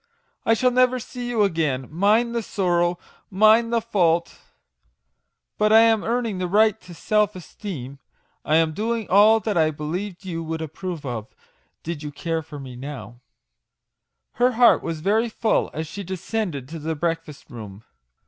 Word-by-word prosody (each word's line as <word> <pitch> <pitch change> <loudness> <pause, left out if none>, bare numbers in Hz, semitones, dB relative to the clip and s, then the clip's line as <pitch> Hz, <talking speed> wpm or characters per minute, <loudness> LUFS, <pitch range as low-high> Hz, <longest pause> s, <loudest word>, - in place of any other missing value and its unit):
I 225 - +5
shall 250 +3 +2
never 255 0 +3
see 245 0 -6
you 225 -3 +2
again 155 -9 0
mine 210 +8 +2
the 235 0 -1
sorrow, 175 -4 0 0.3
mine 215 +4 +5
the 235 0 +2
fault! 175 -7 +1 1.2
But 215 0 +3
I 220 +1 +8
am 225 -2 +4
earning 230 -4 -1
the 180 - -1
right 215 +3 +3
to 175 -1 -12
self 210 +2 +1
esteem; 155 - -8 0.4
I 155 - +1
am 160 -1 +3
doing 225 +3 -2
all 210 +3 +6
that 215 -4 -1
I 155 -1 +4
believe 175 +6 -5
you 165 -3 -4
would 160 0 -4
approve 160 0 -6
of, 120 -4 -4 0.6
did 165 -2 -5
you 150 -1 -6
care 165 +2 -3
for 150 -1 -10
me 130 -2 -9
now/' 120 -4 -8 1.1
Her 250 +2 +2
heart 240 +1 +5
was 165 -2 -4
very 220 +6 +1
full 225 0 0
as 160 - -4
she 200 +6 -7
descended 185 - -4
to 165 0 -7
the 160 +2 -3
breakfast 165 -2 -4
room. 105 -3 -9
180 Hz, 165 wpm, -23 LUFS, 155-220 Hz, 1.2 s, I